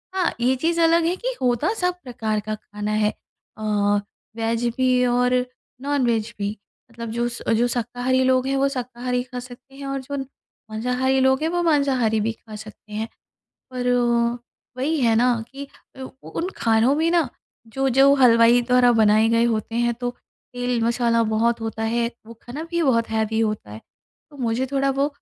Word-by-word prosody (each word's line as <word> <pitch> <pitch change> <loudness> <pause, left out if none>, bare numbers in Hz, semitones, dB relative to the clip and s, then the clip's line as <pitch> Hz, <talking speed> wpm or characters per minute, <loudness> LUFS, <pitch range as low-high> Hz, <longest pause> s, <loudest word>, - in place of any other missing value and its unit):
हाँ, 370 -2 +1
ये 250 +2 +2
चीज़ 330 +6 0
अलग 330 0 +4
है 345 +2 +1
कि - - -4
होता 250 - +1
सब 360 -4 0
प्रकार 220 -4 -2
का 215 +1 -4
खाना 210 0 -6
है। 215 0 +2 0.5
अ, 215 - -8 0.7
वेज 230 +1 -1
भी 255 -1 +3
और 250 +1 +2 0.5
नॉनवेज 240 -6 0
भी। 205 +1 -3 0.3
मतलब 230 0 -7
जो 235 +1 -1 0.3
जो 235 +2 +2
शाकाहारी 245 +2 0
लोग 255 0 +2
हैं 270 - 0
वो 275 +1 +3
शाकाहारी 250 -1 -3
खा 250 0 -7
सकते 250 +2 -13
हैं 280 0 -8
और 275 0 -2
जो 280 +2 -5 0.5
मांसाहारी 250 +4 0
लोग 265 +1 +3
हैं 320 - +1
वो 350 +1 0
मांसाहारी 270 -8 +2
भी 220 +2 0
खा 220 -1 -13
सकते 215 0 -12
हैं। 220 +1 -3 0.7
पर 250 -1 -1
वो 240 -1 +1 0.4
वही 300 +4 0
है 230 -3 +3
ना 245 +2 +4 0.2
कि 280 +1 -7 0.4
उ - - -5 0.3
उन 350 - -2
खानों 225 +4 +3
में 325 +2 +1
ना 335 -5 +2 0.4
जो 270 +4 -1
जो 270 +2 +5
हलवाई 240 -2 +5
द्वारा 250 0 +4
बनाए 220 -1 +4
गए 230 +1 +3
होते 225 -1 -1
हैं, 240 0 +1
तो 245 +1 -3 0.4
तेल 245 -1 -1
मसाला 235 0 +2
बहुत 225 +1 +1
होता 225 0 -4
है 235 +1 0 0.2
वो 230 - -11
खाना 265 +6 -7
भी 340 -1 0
बहुत 230 -6 +2
हैवी 220 0 0
होता 215 - -2
है 105 +1 -9 0.5
तो 290 - -15
मुझे 245 0 -1
थोड़ा 275 0 +2
वो 275 +1 +1
245 Hz, 180 wpm, -22 LUFS, 225-265 Hz, 0.7 s, जो